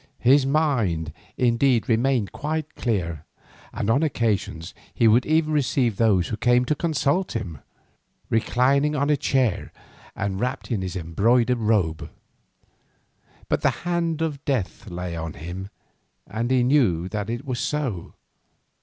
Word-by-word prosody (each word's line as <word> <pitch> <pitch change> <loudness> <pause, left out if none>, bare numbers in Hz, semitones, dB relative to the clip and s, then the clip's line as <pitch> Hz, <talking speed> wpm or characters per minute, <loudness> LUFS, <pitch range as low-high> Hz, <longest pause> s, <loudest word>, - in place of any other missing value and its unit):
His 135 +2 +5
mind 115 - 0 0.2
indeed 120 0 +2
remained 120 -2 +1
quite 155 0 -3
clear, 85 - -2 0.5
and - - -3
on 120 +6 +3
occasions 110 - -1 0.2
he 115 - +4
would 115 +3 +4
even 155 0 +2
receive 130 -6 +1
those 100 -6 +3
who 110 - -3
came 125 +2 +3
to 140 - +1
consult 155 +2 0
him, 85 -10 -4 0.7
reclining 135 +6 +2
on 145 +1 +1
a - - +4
chair 130 -6 0 0.4
and 95 -1 -2
wrapped 125 +3 -3
in 105 -5 0
his 95 -1 -4
embroidered 115 +9 +2
robe. 100 -8 0 1.4
But - - 0
the - - +4 0.2
hand 170 -2 0
of 150 -3 -3
death 125 -8 -2
lay 90 -1 -5
on 80 -1 -5
him, 90 +5 -7 0.6
and 115 +5 -3
he 130 -1 +3
knew 115 - +2
that 105 0 -3
it 120 +5 -4
was 125 -3 -3
so. 130 - -3
120 Hz, 140 wpm, -24 LUFS, 95-140 Hz, 1.4 s, His